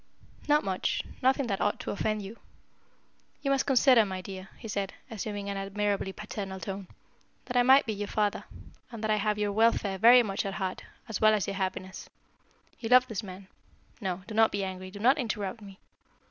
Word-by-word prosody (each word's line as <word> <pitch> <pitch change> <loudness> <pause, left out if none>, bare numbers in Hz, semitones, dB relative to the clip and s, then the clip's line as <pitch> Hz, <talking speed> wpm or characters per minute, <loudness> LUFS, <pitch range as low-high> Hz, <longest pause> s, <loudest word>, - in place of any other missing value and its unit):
"Not 295 0 +4
much 190 -1 -1 0.2
nothing 265 +1 +3
that 200 -4 -2
ought 205 - 0
to - - -4
offend 215 0 -1
you. 205 +4 -9 1.0
You 275 - +1
must 275 -1 +1
consider, 260 -3 +6
my 190 -2 -4
dear," 190 0 -8
he 230 - -9
said, 200 -2 -3 0.2
assuming 205 -1 -4
an 200 0 -3
admirably 200 0 -1
paternal 195 -1 -6
tone, 190 +2 -6 0.6
"that 245 - -6
I 245 - +6
might 265 +3 +6
be 220 - -2
your 205 0 -4
father, 210 -1 -1 0.5
and 230 -2 -8
that 215 - +1
I 215 - +3
have 210 0 0
your 210 -1 0
welfare 210 -2 +2
very 240 +3 +8
much 195 -3 -2
at 195 -1 -4
heart, 190 -2 -3 0.3
as 225 -4 -4
well 215 0 +6
as 200 -5 -1
your 195 - -4
happiness. 190 -1 -4 0.7
You 225 - -4
love 250 0 +7
this 220 -4 -3
man 190 -2 -10 0.5
no, 185 -2 -3
do 225 - -8
not 225 0 +4
be 200 -1 -2
angry, 185 0 -5
do 200 - -10
not 250 +8 +3
interrupt 215 -3 -3
me. 195 -2 -12
205 Hz, 200 wpm, -29 LUFS, 195-225 Hz, 1.0 s, very